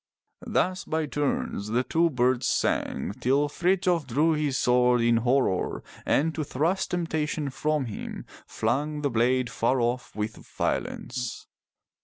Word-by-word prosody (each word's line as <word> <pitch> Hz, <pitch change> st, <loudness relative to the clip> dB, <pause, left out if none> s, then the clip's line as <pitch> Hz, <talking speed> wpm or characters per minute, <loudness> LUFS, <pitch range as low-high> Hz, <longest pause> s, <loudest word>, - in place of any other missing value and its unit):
'* -, -, -52 dB
Thus 185 Hz, +1 st, 0 dB
by 160 Hz, 0 st, -1 dB
turns 145 Hz, -8 st, -2 dB
the 120 Hz, +4 st, +1 dB
two 165 Hz, +5 st, +2 dB
birds 125 Hz, -2 st, +1 dB
sang, -, -, 0 dB
till 140 Hz, +4 st, +3 dB
Frithjof 175 Hz, -1 st, +1 dB
drew 150 Hz, +7 st, +2 dB
his 150 Hz, -3 st, 0 dB
sword 125 Hz, 0 st, +3 dB
in 115 Hz, 0 st, +4 dB
horror, 120 Hz, -5 st, +1 dB, 0.2 s
and 160 Hz, +3 st, +2 dB
to 155 Hz, -, -2 dB
thrust 165 Hz, +8 st, 0 dB
temptation 155 Hz, -4 st, -1 dB
from 150 Hz, 0 st, 0 dB
him, 110 Hz, -, -6 dB, 0.2 s
flung 145 Hz, +7 st, -1 dB
the 140 Hz, -, +1 dB
blade 125 Hz, +2 st, +2 dB
far 125 Hz, +3 st, +1 dB
off 120 Hz, +1 st, -1 dB
with 105 Hz, +1 st, -3 dB
violence. 125 Hz, -2 st, -3 dB
135 Hz, 140 wpm, -27 LUFS, 125-155 Hz, 0.2 s, in